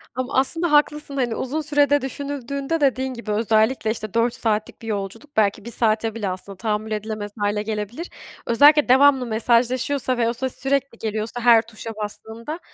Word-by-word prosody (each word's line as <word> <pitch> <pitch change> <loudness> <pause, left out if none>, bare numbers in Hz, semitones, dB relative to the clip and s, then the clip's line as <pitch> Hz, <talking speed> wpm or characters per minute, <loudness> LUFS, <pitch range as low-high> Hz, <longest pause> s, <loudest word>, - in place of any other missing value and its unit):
Ama 255 +1 -3
aslında 330 +4 0
haklısın 295 -1 +2
da - - +2
hani 240 -2 -1
uzun 290 +5 -2
sürede 290 -1 +2
düşünüldüğünde 280 +3 -4
dediğin 265 -1 +1
gibi 235 -3 -6
özellikle 220 +1 +2
işte 215 -2 -6
4 230 +1 +2
saatlik 220 -4 -2
bir 225 - -9
yolculuk 220 +7 -5
belki 205 0 +2
1 235 - -6
saate 220 -1 0
bile 210 -4 -2
aslında 185 +2 -6
tahammül 215 +1 -2
edilemez 215 -1 -4
hâle 205 0 0
gelebilir. 220 - -4 0.4
Özellikle 290 +4 +5
devamlı 265 -1 +5
mesajlaşıyorsa 245 +3 +1
ve 230 -1 +2
o 235 - -1
ses 260 +1 -4
sürekli 275 -3 -1
geliyorsa 220 +2 -4
her 230 -2 +6
tuşa 225 0 -10
bastığında 220 +7 -6
235 Hz, 170 wpm, -22 LUFS, 215-275 Hz, 0.4 s, her